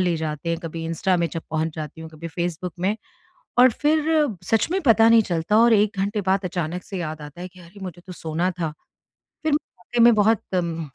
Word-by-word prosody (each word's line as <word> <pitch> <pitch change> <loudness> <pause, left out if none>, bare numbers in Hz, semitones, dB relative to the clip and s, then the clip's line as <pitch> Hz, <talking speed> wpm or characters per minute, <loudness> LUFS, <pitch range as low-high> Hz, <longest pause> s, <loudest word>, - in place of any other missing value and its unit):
ले 175 -2 +1
जाते 155 +1 -4
हैं, 165 0 0
कभी 165 -1 -6
इंस्टा 175 +3 0
में 170 -1 +1
जब 165 - -4
पहुँच 160 0 -1
जाती 155 0 -6
हूँ, 160 0 -8
कभी 165 +2 -8
फेसबुक 175 +1 -3
में। 200 +4 +1 0.6
और 255 0 +8
फ़िर 305 +3 +2 0.2
सच 225 +4 +2
में 385 +1 +1
पता 225 -3 +6
नहीं 230 -1 +6
चलता 175 +4 +1
और 235 0 +6
1 210 -1 +3
घंटे 205 +2 0
बाद 195 0 +1
अचानक 175 0 -3
से 195 - -6
याद 155 -2 -4
आता 150 +4 -10
है 180 - -5
कि 185 0 -17
अरे 175 +4 -15
मुझे 175 -2 -7
तो 185 - -7
सोना 165 +2 -2
था। 160 -2 0 0.7
फ़िर 310 -2 +1
वाक़ई 240 - -2
में 240 - +8
बहुत 215 0 +3
म 165 -4 -2
180 Hz, 220 wpm, -23 LUFS, 165-215 Hz, 0.7 s, और